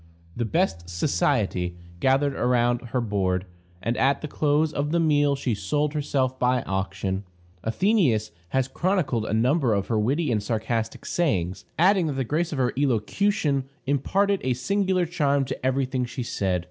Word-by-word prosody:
The 120 - -1
"best 110 - 0
society" 90 - 0 0.2
gathered 135 +5 +2
around 120 -1 +2
her 125 +2 -1
board, 95 -4 0 0.4
and 115 +4 0
at 135 +1 +2
the 155 - -4
close 150 +1 +1
of 145 0 -1
the 170 - +2
meal 145 -3 +3
she 135 -3 -1
sold 145 +9 -1
herself 135 -3 -1
by 125 -1 +2
auction. 95 0 -2 0.4
Athenæus 125 - +2 0.2
has 130 +3 +1
chronicled 165 - 0
a - - -2
number 125 0 +2
of 100 -1 -2
her 110 -2 +2
witty 140 +7 +1
and 110 -3 +1
sarcastic 110 +1 -2
sayings, 95 - -1
adding 185 0 +4
that 150 - -1
the 135 0 -1
grace 160 +7 -1
of 150 - -3
her 125 -2 +1
elocution 140 - +1 0.2
imparted 195 +9 +1
a 130 - +1
singular 190 +5 +1
charm 145 -5 +1
to - - -6
every 130 +1 +1
thing 130 -1 -2
she 125 +1 -5
said. 95 -5 -1
130 Hz, 165 wpm, -25 LUFS, 110-150 Hz, 0.4 s, adding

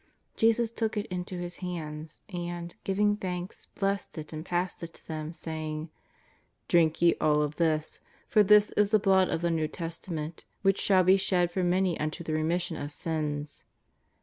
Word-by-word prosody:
Jesus 225 0 +3
took 225 -2 -2
it 205 - -1
into 180 0 -3
His 175 0 -5
hands, 155 -3 -6
and, 175 -2 -5
giving 205 +2 +2
thanks, 180 -2 -5
blessed 195 -2 -2
it 155 0 -6
and 155 0 -5
passed 180 +1 -2
it 165 -1 -7
to - - -14
them, 155 -1 -4
saying: 155 -1 -5 0.4
" - - -39
Drink 165 -1 +3
ye 170 - +6
all 150 -1 +4
of 150 0 -3
this. 155 -2 0 0.3
For 215 - +5
this 210 +1 +6
is 210 -1 +2
^ly 215 0 +4
Blood 190 -2 +4
of 165 - -1
the 170 0 +1
'New 160 -1 +1
Testament 165 -1 -5 0.2
which 195 -1 +3
shall 190 -2 +5
be 190 +2 +6
shed 180 -2 +2
for 185 +1 -1
many 180 -1 +2
unto 155 +3 -3
the 160 - -3
remission 165 +2 0
of 145 +1 -4
sins." 150 -2 -3
175 Hz, 180 wpm, -29 LUFS, 155-190 Hz, 0.4 s, ye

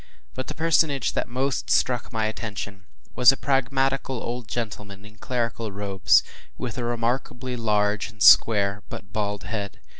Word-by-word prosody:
” - - -39
But 130 - -5
the - - -6
personage 160 -4 +2
that - - -1
most 130 +3 -2
struck 125 -2 +1
my 110 -1 -1
attention 105 -2 -5 0.3
was 125 0 +7
a 135 - -4
pragmatical 135 0 0
old 120 -1 -5
gentleman 105 -4 -6
in 110 0 -15
clerical 115 -2 -3
robes, 100 -1 +3 0.3
with 125 0 -5
a - - -2
remarkably 120 +2 -2
large 105 -2 0
and 110 -1 -18
square 100 -2 +6
but 100 +2 -9
bald 105 -2 -2
head. 100 0 -5
115 Hz, 155 wpm, -24 LUFS, 105-130 Hz, 0.3 s, was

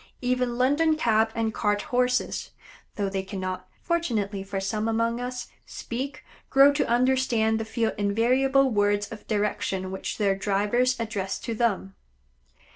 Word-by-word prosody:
Even 250 -1 0
London 290 +5 +3
cab 225 -5 +3
and 225 -1 -1
cart 205 -1 0
Horses, 250 0 0 0.5
though 200 -1 -1
they 195 0 -2
cannot 185 -1 -5 0.2
fortunately 220 - -1
for 195 0 -4
some 210 +3 -2
among 230 +1 0
us 250 0 -5 0.2
speak, 265 +4 -5 0.3
grow 275 +1 +6
to 290 - 0
understand 240 -3 +2
the 225 - -3
few 225 0 0
invariable 255 +6 +3
words 205 -1 +2
of 220 - -10
direction 205 -3 -1
which 190 - -4
their 200 -2 +2
drivers 210 +6 +1
address 205 -4 -2
to 230 - -3
them. 215 -4 0
225 Hz, 140 wpm, -26 LUFS, 205-250 Hz, 0.5 s, grow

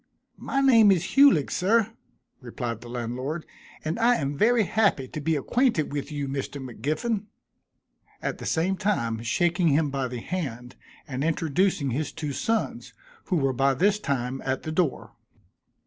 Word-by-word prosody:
"My 275 - -1
name 230 -6 +6
is 180 -2 0
Hulig, 275 - +5
sir," 220 +3 +2 0.5
replied 120 -2 -5
the 120 - -10
landlord, 125 +7 -4 0.4
"and 160 +7 -2
I 240 +1 +4
am 140 -5 -2
very 230 +7 +4
happy 200 -10 +1
to 155 - -6
be 160 +2 +1
acquainted 225 - +1
with 145 +1 -4
you, 145 -2 -3
Mr. 135 +1 -4
M'Giffin," 155 - -3 0.9
at - - -4
the - - -5
same 180 +4 +1
time 120 - -1
shaking 175 +9 +1
him 150 -1 +2
by 135 -2 -1
the 125 -1 -5
hand, 125 -9 -5 0.3
and 135 0 -3
introducing 165 -2 +1
his 145 +4 -2
two 150 -3 -4
sons, 225 - -2 0.3
who 185 - -1
were 135 -5 +1
by 135 +1 +2
this 205 +8 +2
time 130 -6 -2
at 130 0 -2
the 155 - -4
door. 160 -4 -1
155 Hz, 160 wpm, -26 LUFS, 135-195 Hz, 0.9 s, name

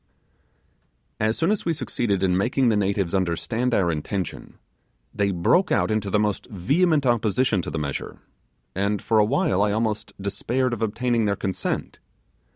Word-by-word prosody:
As 110 +1 +1
soon 165 +4 +2
as 210 - 0
we 170 - 0
succeeded 120 - -1
in 90 -1 +2
making 120 +6 +2
the 110 - +2
natives 100 -3 0
understand 100 +7 0
our 95 -7 +2
intention, 85 +4 -4 0.6
they 100 -1 +1
broke 100 - +2
out - - +2
into 105 -2 -1
the 105 - +2
most 105 -1 -1
vehement 145 - +1
opposition 120 -2 +2
to - - -5
the - - -4
measure, 70 -3 -4 0.6
and 100 +2 0
for 110 -1 +2
a - - +6
while 100 -2 +1
I 105 0 +2
almost 110 0 -2
despaired 120 +6 -1
of 115 - -4
obtaining 115 +1 0
their 100 -1 +1
consent. 95 -1 -3
105 Hz, 165 wpm, -24 LUFS, 95-120 Hz, 0.6 s, a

